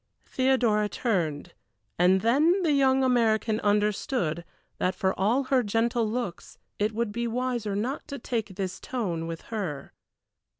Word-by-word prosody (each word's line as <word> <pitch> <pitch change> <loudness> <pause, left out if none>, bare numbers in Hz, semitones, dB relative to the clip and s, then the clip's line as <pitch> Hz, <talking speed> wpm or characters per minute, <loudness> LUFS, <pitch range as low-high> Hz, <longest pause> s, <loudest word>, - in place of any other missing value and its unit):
Theodora 240 -5 +2
turned, 175 - -2 0.5
and 185 +2 +4
then 310 - +3
the 320 - +2
young 270 -2 +3
American 225 -3 +2
understood 205 - 0 0.4
that 185 +1 0
for 190 0 0
all 225 +8 +1
her 260 -1 +2
gentle 225 +1 0
looks 230 -6 -5 0.2
it 210 +2 +1
would 225 0 -2
be 235 +2 -2
wiser 240 -3 -2
not 245 +8 -3
to 280 - -5
take 225 -6 -3
this 190 -2 -4
tone 175 -10 -3
with 165 -1 -5
her. 160 -10 -4
220 Hz, 140 wpm, -27 LUFS, 190-250 Hz, 0.5 s, and